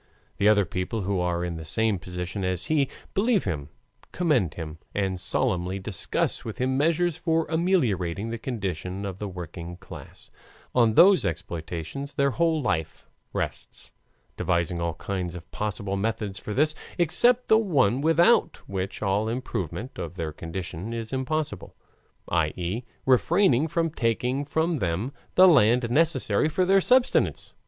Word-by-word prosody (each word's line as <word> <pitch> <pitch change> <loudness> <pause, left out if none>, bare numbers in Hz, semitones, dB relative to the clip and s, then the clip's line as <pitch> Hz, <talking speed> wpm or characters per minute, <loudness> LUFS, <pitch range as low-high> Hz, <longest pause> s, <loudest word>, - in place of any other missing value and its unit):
And 105 - +5
other 100 -2 +4
people 90 +6 -3
who 95 0 -1
are 90 0 0
in 85 -2 -4
the 80 - -7
same 105 +5 +1
position 90 +2 -5
as 90 -1 -1
he 145 -4 +1 0.2
believe 215 0 +2
him, 75 -6 -3 0.4
commend 135 - +1
him, 80 -1 -7 0.2
and 95 -2 -1
solemnly 90 0 0
discuss 100 +1 -2
with 110 -1 -6
him 130 0 0
measures 165 +3 +2
for 165 -2 +1
ameliorating 115 - +1
the 115 - -4
condition 95 - -4
of 95 -1 -5
the 105 - -3
working 85 -1 -7
class, 95 - -12 0.4
on 115 -3 +3
whose 195 +1 +7
exploitation 85 - -4
their 140 0 +2
whole 160 +2 +1
life 80 -9 -2 0.2
rests, - - -5 0.5
devising 85 -1 0
all 85 -1 -1
kinds 90 -3 -4
of 90 0 -10
possible 100 -1 -3
methods 105 -1 -2
for - - -7
this, 155 +2 +3 0.2
except 240 +9 +3
the 220 - +6
one 135 - +2
without 165 +9 +4
which 95 +1 -4
all 100 +2 +1
improvement 120 - -4
of 85 +1 -5
their 80 -3 -3
condition 85 +6 -6
is 115 +1 -5
impossible, 150 +4 -3 0.5
i. 80 -2 +2
e., 95 +7 -3 0.2
refraining 150 - +4
from 165 0 0
taking 125 +1 0
from 160 +3 0
them 95 +4 -1 0.2
the 185 +1 +8
land 120 - +4
necessary 160 +1 +2
for 185 +4 +1
their 195 +1 +4
subsistence. 250 +5 +2
110 Hz, 150 wpm, -26 LUFS, -, 0.5 s, the